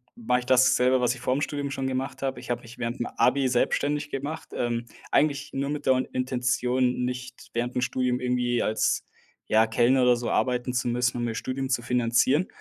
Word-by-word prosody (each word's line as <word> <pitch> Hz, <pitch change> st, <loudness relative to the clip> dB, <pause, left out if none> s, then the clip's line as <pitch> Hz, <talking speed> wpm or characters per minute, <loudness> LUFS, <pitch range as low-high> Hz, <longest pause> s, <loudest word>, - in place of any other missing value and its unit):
mache 225 Hz, -, 0 dB
ich -, -, -11 dB
dasselbe, 130 Hz, 0 st, +4 dB
was 125 Hz, 0 st, +1 dB
ich 120 Hz, -, -12 dB
vorm 130 Hz, +3 st, 0 dB
Studium 145 Hz, 0 st, -2 dB
schon 135 Hz, -1 st, -2 dB
gemacht 130 Hz, 0 st, -3 dB
habe. 135 Hz, -1 st, -2 dB
Ich -, -, -12 dB
habe 120 Hz, -1 st, -1 dB
mich 115 Hz, +1 st, -13 dB
während'm 120 Hz, +1 st, -3 dB
Abi 135 Hz, +1 st, +3 dB
selbstständig 145 Hz, +4 st, 0 dB
gemacht. 150 Hz, +4 st, -5 dB
Ähm, 120 Hz, -1 st, -2 dB, 0.3 s
eigentlich 145 Hz, -1 st, +1 dB
nur 140 Hz, +1 st, -2 dB
mit 145 Hz, 0 st, -4 dB
der 130 Hz, -1 st, +4 dB
Intention, 125 Hz, 0 st, 0 dB
nicht 125 Hz, 0 st, -6 dB
während 120 Hz, +1 st, -2 dB
dem 125 Hz, -, +1 dB
Studium 125 Hz, 0 st, 0 dB
irgendwie 125 Hz, -1 st, 0 dB
als, 110 Hz, -, 0 dB, 0.4 s
ja, 110 Hz, +1 st, +4 dB
Kellner 120 Hz, +4 st, +3 dB
oder 125 Hz, -1 st, +5 dB
so 120 Hz, -, -3 dB
arbeiten 125 Hz, 0 st, 0 dB
zu 125 Hz, -1 st, 0 dB
müssen, 125 Hz, +1 st, 0 dB
um 120 Hz, -, -2 dB
mir 115 Hz, -2 st, -2 dB
Studium 130 Hz, +3 st, -3 dB
zu 130 Hz, -3 st, +1 dB
finanzieren. 125 Hz, +6 st, +2 dB
125 Hz, 195 wpm, -26 LUFS, 120-135 Hz, 0.4 s, oder